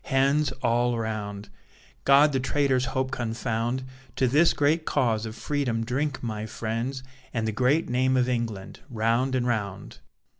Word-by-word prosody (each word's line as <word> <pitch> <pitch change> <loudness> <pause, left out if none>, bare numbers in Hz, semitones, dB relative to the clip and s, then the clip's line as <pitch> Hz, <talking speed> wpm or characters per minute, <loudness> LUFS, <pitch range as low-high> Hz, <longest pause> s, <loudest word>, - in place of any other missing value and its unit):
Hands 140 +2 +2
all 120 0 +2
round! 105 -2 -4 0.6
God 140 +2 +6
the 130 - +1
traitor's 135 -1 +1
hope 130 0 -2
confound! 120 +1 -2 0.3
To 130 - +2
this 150 +7 +4
great 155 +3 +1
cause 115 -8 0
of 110 - -7
Freedom 125 -4 -1
drink, 135 +3 -2
my 110 -2 -3
friends, 115 +5 -3 0.3
And 110 -1 0
the - - 0
great 130 +8 +2
name 130 +1 +2
of 125 -1 +2
England, 115 -6 -3
round 115 +3 +1
and 125 -1 0
round. 100 -5 -3
125 Hz, 150 wpm, -26 LUFS, 115-135 Hz, 0.6 s, God